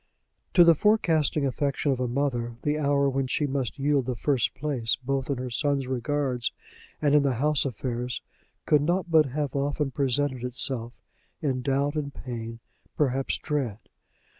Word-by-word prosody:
To 175 - +9
the 170 0 +7
forecasting 160 -6 +2
affection 140 +2 0
of 130 - -1
a 125 - 0
mother, 120 -2 -1
the 150 +1 0
hour 140 -1 +2
when 135 -1 0
she 150 - 0
must 135 -3 -2
yield 140 -2 +1
the 125 - -1
first 130 0 +1
place 130 -6 0
both 135 +1 -1
in 140 - 0
her 125 0 -4
son's 140 +1 0
regards 130 -1 -1 0.5
and 145 -2 +2
in 150 - +6
the 140 -3 +1
house 150 +4 +2
affairs 125 0 -3 0.4
could 150 -2 +4
not 175 +3 0
but 155 -3 +6
have 145 +2 -3
often 140 0 0
presented 135 -1 0
itself, 125 -1 -2 0.5
in 135 -5 -1
doubt 140 +2 +1
and 145 -2 -3
pain 115 -2 -6 0.4
perhaps 135 -2 +1
dread. 135 -9 -2
140 Hz, 165 wpm, -27 LUFS, 125-145 Hz, 0.5 s, To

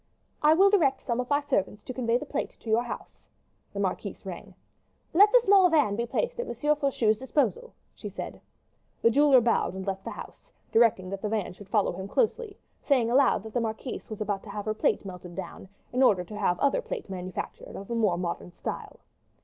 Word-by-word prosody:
"I 305 +1 +6
will 390 +3 +5
direct 280 -10 +3
some 235 -1 -1
of 250 - -3
my 285 0 +2
servants 210 -6 -1
to 255 - -6
convey 240 -2 +1
the 295 - -6
plate 290 0 -3
to 225 - -9
your 225 +2 +4
house." 240 - -9 0.4
The - - -6
marquise - - -3
rung. - - -8 0.6
"Let 410 +5 +7
the - - +7
small 390 -2 +6
van 295 -11 +3
be 235 +2 -2
placed 485 - -2
at 485 - -2
M. - - -5 0.2
Faucheux's 245 -7 +1
disposal," 305 - -1 0.2
she - - -8
said. - - -7 0.6
The 230 - +6
jeweler 280 0 +6
bowed 230 -4 +1
and 190 0 -5
left 195 -1 -3
the - - -5
house, - - -10 0.2
directing 215 -5 +3
that 195 -1 -5
the 210 - -2
van 210 -4 -2
should 195 +1 -14
follow 210 -3 +2
him 190 +2 -6
closely, 435 - -1 0.2
saying 245 -5 +2
aloud, 260 -5 +4
that 220 -1 -9
the 245 - +1
marquise 225 +3 -5
was 215 -1 -7
about 205 -2 -1
to 215 - -12
have 205 0 -5
her 215 - 0
plate 215 - 0
melted 180 -2 -9
down 190 0 -8 0.2
in 255 - +1
order 200 -8 +4
to 210 +4 -10
have 195 -4 0
other 285 - +2
plate - - -6
manufactured 185 -1 -6
of 200 +4 -8
a - - 0
more 210 -7 +2
modern 175 0 -4
style. - - -7
230 Hz, 215 wpm, -27 LUFS, 200-285 Hz, 0.6 s, Let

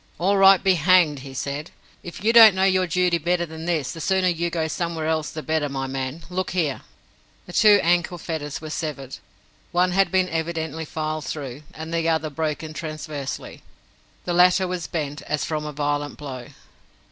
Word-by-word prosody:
"All 195 +4 +2
right 195 -1 +6
be 190 -1 +4
hanged," 170 -3 +4
he 135 0 -10
said. 140 +4 -4 0.3
"If 175 +2 -9
you 225 +2 +3
don't 225 -4 +9
know 190 - +1
your 185 -1 +3
duty 175 0 +1
better 175 +2 0
than 160 0 -9
this, 160 -6 -1
the 165 - -8
sooner 190 +2 +2
you 170 0 -1
go 165 -2 -1
somewhere 165 0 -3
else 155 -1 0
the 155 - -7
better, 155 -2 0
my 135 -1 -3
man. 135 +4 -4
Look 185 +1 -3
here!" 150 -6 0 0.6
The 175 - -11
two 210 0 +6
ankle 175 +1 +1
fetters 150 -4 -5
were 155 -1 -7
severed. 145 -6 -5 0.5
One 180 +1 +2
had 195 0 +3
been 185 -1 +2
evidently 160 -1 -3
filed 155 -1 -4
through, 135 -1 -6
and 160 +1 -7
the 165 0 +1
other 160 -1 0
broken 155 +1 -3
transversely. 155 -4 -6 0.6
The 175 - -1
latter 180 +1 +4
was 180 -2 -4
bent, 150 -3 -4
as 150 -1 -1
from 150 -1 -3
a - - -4
violent 145 0 -2
blow. 130 -5 -7
160 Hz, 185 wpm, -23 LUFS, 150-180 Hz, 0.6 s, don't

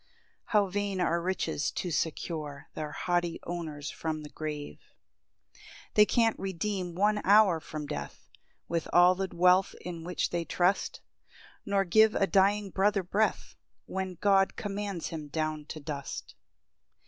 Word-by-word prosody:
How 210 -2 +3
vain 200 0 -2
are 170 -1 +1
riches 170 -5 -1
to 180 - -3
secure 155 -2 -3
Their 150 -1 -5
haughty 175 +1 -1
owners 155 -4 -5
from 155 -1 -4
the 150 - -10
grave! 150 -2 -5 0.7
2 - - -23 0.3
They 210 - +7
can't 230 -2 +2
redeem 190 -1 -3
one 210 +3 +2
hour 200 -4 +5
from 155 -1 -6
death, 150 - -7 0.4
With 170 -1 -2
all 175 +1 +7
the 190 +1 -3
wealth 180 +2 +4
in 170 -2 -6
which 180 +1 -2
they 170 -1 -1
trust; 180 +3 0 0.7
Nor 200 -1 +2
give 220 +4 +5
a 195 - +3
dying 200 +1 +2
brother 195 +1 +2
breath, 210 +5 0 0.3
When 190 -1 -4
God 195 +1 +3
commands 200 -3 -4
him 155 -2 -6
down 155 0 -2
to 155 - -7
dust. 140 -2 -6
180 Hz, 145 wpm, -29 LUFS, 160-195 Hz, 0.7 s, They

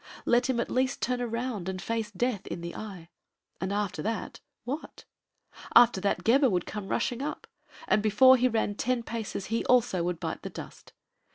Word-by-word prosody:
Let 245 +2 +3
him 250 -2 +1
at - - -2
least 260 +1 +1
turn 250 0 -1
around 230 -5 -3
and 185 0 -4
face 225 +1 -2
death 225 0 -2
in 170 - -5
the 170 0 -6
eye. 190 -6 -8 0.5
And 190 +1 -2
after 205 -1 -2
that, 225 +1 -3 0.2
what? 275 +6 -6 0.7
After 235 -5 +7
that, 200 - 0
Gebhr 265 +3 +5
would 180 -4 0
come 210 -2 -6
rushing 240 +3 -1
up, 295 - -4 0.4
and 215 - +3
before 220 +5 +6
he 255 0 +3
ran 220 -3 0
ten 240 +3 -1
paces 220 -4 -4
he 230 - +1
also 235 -8 +3
would 175 0 -2
bite - - -4
the - - -6
dust. - - -10
230 Hz, 185 wpm, -28 LUFS, 200-250 Hz, 0.7 s, After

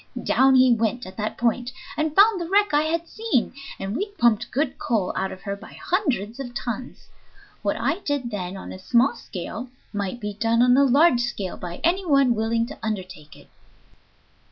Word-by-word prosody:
Down 265 0 +4
he 255 -1 +6
went 230 +2 -1
at 185 - -10
that 215 0 -3
point, 240 +1 0 0.3
and 310 0 -1
found 405 -1 +6
the 335 - -4
wreck 405 -2 +3
I 295 - +5
had 335 +1 -1
seen, 435 - -1 0.2
and 195 +3 -4
we 400 +10 -1
pumped 235 -3 +3
good 275 0 -1
coal 210 -6 0
out 190 0 -1
of 185 - -10
her 200 -1 -3
by 200 - -13
hundreds 255 - -1
of 245 -3 -6
tons. 245 +1 -5 0.5
What - - 0
I 360 - 0
did 285 -9 -2
then 190 -2 -4
on - - -8
a - - -9
small 240 +7 +3
scale 220 +6 -7 0.2
might 205 +2 -3
be 210 -2 -4
done 230 +3 +2
on 250 0 +5
a 280 +1 +5
large 275 -1 +5
scale 205 -6 -3
by 175 0 -7
any 360 +4 +2
one 275 -7 +4
willing 230 +1 0
to 285 - -10
undertake 185 -8 -5
it." - - -18
240 Hz, 195 wpm, -24 LUFS, 210-285 Hz, 0.5 s, he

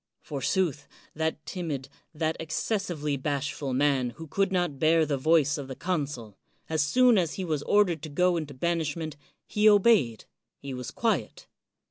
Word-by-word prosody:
Forsooth, 150 +1 -1 0.3
that 160 -1 -2
timid, 155 -7 -4 0.2
that 160 0 -1
excessively 165 -3 -2
bashful 140 0 -2
man 130 -3 +1 0.2
could 195 -1 +1
not 175 -7 0
bear 160 +1 +4
the 145 -1 0
voice 150 +1 +3
of 140 - -6
the 130 - -6
consul; 140 - -3 0.3
as 160 -1 0
soon 240 +8 +4
as 170 -3 -1
he 190 - -3
was 155 -4 -1
ordered 180 -3 +2
to 155 - -6
go 180 +4 +2
into 150 -4 -4
banishment, 160 0 -2 0.3
he 210 +1 +4
obeyed, 200 - +4 0.3
he 140 -1 -7
was 125 -2 -5
quiet. 200 - -1
155 Hz, 150 wpm, -27 LUFS, 140-175 Hz, 0.3 s, bear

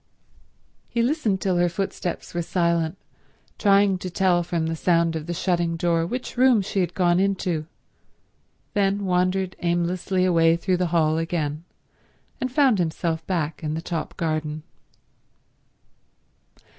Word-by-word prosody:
He 235 - 0
listened 235 -8 0
till 185 -2 +1
her 175 0 +3
footsteps 180 -1 -4
were 175 - -1
silent, 170 0 0 0.6
trying 200 -2 +4
to 185 - -5
tell 180 0 +2
from 170 -2 -2
the 165 0 -2
sound 165 0 +2
of 160 0 -5
the 175 - -2
shutting 170 -1 0
door 165 -1 +1
which 250 +4 -5
room 250 -5 +5
she 195 - -2
had 175 -2 -1
gone 175 -1 +3
into, 185 -5 0 1.1
then 200 0 +1
wandered 185 +1 0
aimlessly 175 +2 0
away 165 -2 +4
through 180 +2 0
the 180 0 0
hall 160 -1 +2
again, 160 -2 -2 0.7
and 255 - -2
found 260 -6 +3
himself 165 -1 -1
back 165 -3 -2
in 155 0 -2
the - - -2
top 165 -3 -4
garden. 155 -2 -2
175 Hz, 140 wpm, -24 LUFS, 165-190 Hz, 1.1 s, room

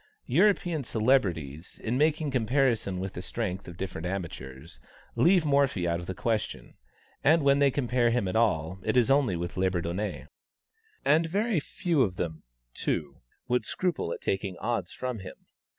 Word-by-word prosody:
European 175 0 +2
celebrities, 95 - 0
in 115 +2 -1
making 155 +1 +2
comparison 115 -6 +1
of 95 - -6
the 90 - -5
strength 100 -3 -4
of 85 -1 -9
different 90 -2 -4
amateurs, 85 -5 -6 0.4
leave 175 -1 +4
Morphy 140 -11 +2
out 85 0 0
of 85 - -8
the 95 - -4
question; 110 +1 -2 0.5
and 155 +1 +5
when 140 0 +4
they 140 -1 +5
compare 125 -3 +1
him 115 -4 +1
at 95 - -3
all, 90 -5 +1
it - - +1
is 125 +1 +4
only 135 -9 +3
with 85 +1 -4
Labourdonnais. 95 +1 -1 0.8
And 165 +2 +4
very 205 +2 +1
few 165 +1 0
of 95 -7 +1
them, 80 -3 -4 0.3
too, - - -3 0.3
would 125 0 +1
scruple 180 - -1
at - - -5
taking 95 -2 -2
odds 105 -5 -2
from 125 -3 -4
him. 95 - -9
115 Hz, 160 wpm, -28 LUFS, 90-140 Hz, 0.8 s, and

